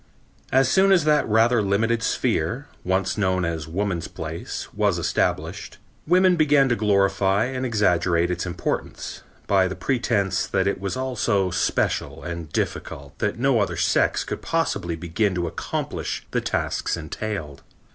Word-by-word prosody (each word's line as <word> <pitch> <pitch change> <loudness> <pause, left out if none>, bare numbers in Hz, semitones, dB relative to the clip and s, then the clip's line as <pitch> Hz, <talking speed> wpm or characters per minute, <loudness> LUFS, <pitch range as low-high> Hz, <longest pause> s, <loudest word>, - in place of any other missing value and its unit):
As 135 0 +4
soon 190 +8 +4
as 180 -5 +5
that 150 -5 +2
rather 115 +2 +4
limited 110 +4 +1
sphere, - - 0 0.2
once 95 +3 0
known 95 -2 +1
as 80 -3 -3
woman's 90 -1 -2
place, 80 -1 -6
was - - +1
established, - - -1 0.3
women 180 +2 +5
began 145 -4 +4
to 120 - +2
glorify 100 -1 +2
and 130 0 -2
exaggerate 90 -5 +2
its 90 0 -2
importance, 90 0 -4 0.2
by 95 -2 +3
the 95 - -5
pretense 115 -7 0
that - - 0
it 100 -1 -1
was 100 +3 -3
all 130 -1 -3
so 100 -3 +1
special - - -1
and 85 -2 -6
difficult 70 0 -4
that 105 0 -1
no 130 -1 +2
other 100 - -1
sex - - +2
could - - -5
possibly 85 -1 -1
begin 90 +4 -1
to 90 -1 -1
accomplish 85 0 -4
the - - 0
tasks - - -1
entailed. 80 -3 -5
100 Hz, 150 wpm, -23 LUFS, 85-120 Hz, 0.3 s, as